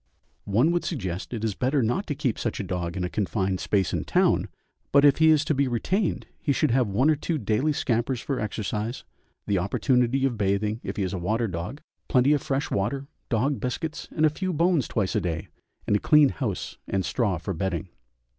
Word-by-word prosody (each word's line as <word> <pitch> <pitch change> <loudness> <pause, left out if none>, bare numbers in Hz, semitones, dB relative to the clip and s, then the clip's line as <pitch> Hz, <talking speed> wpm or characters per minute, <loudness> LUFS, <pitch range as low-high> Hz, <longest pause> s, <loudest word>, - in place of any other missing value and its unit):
One 120 +11 +3
would 175 0 0
suggest, 95 - -4
it 115 -3 -4
is 110 -2 0
better 130 +5 +1
not 120 - 0
to 145 - -2
keep 125 -4 -1
such - - -2
a - - -2
dog 90 -2 -3
in 90 - -1
a - - 0
confined 95 -1 -1
space 95 -3 0
in - - -1
town, - - +2 0.4
but 140 +1 +6
if 145 - +6
he 160 0 +5
is 155 -1 +4
to 155 - +1
be 140 -1 +1
retained 175 - 0
he 145 - 0
should 145 0 +2
have 125 -1 +3
one 105 +8 +2
or - - +3
two 160 +2 -2
daily 115 +5 +1
scampers 120 -2 0
for 135 +2 -3
exercise, 110 +2 -3 0.4
the 100 -2 +1
opportunity 125 +7 +1
of 120 -5 -1
bathing, 105 +2 0
if - - -5
he 100 - 0
is 95 - -2
a 95 - -2
water 110 +6 0
dog, 90 - -5 0.3
plenty 130 +2 +4
of 145 - +1
fresh 140 +1 -2
water, 135 +8 -1 0.2
dog 130 +4 +1
biscuits, 155 +5 -4
and 155 - +1
a 155 - +4
few 185 +4 -2
bones 170 -3 +2
twice 100 -4 -1
a - - +2
day, 80 -2 -3 0.4
and 105 - +2
a - - +3
clean 150 +2 +5
house 115 -10 -4
and 95 -1 -1
straw 105 -8 0
for 95 +4 -4
bedding. 95 +2 -2
120 Hz, 215 wpm, -26 LUFS, 100-140 Hz, 0.4 s, but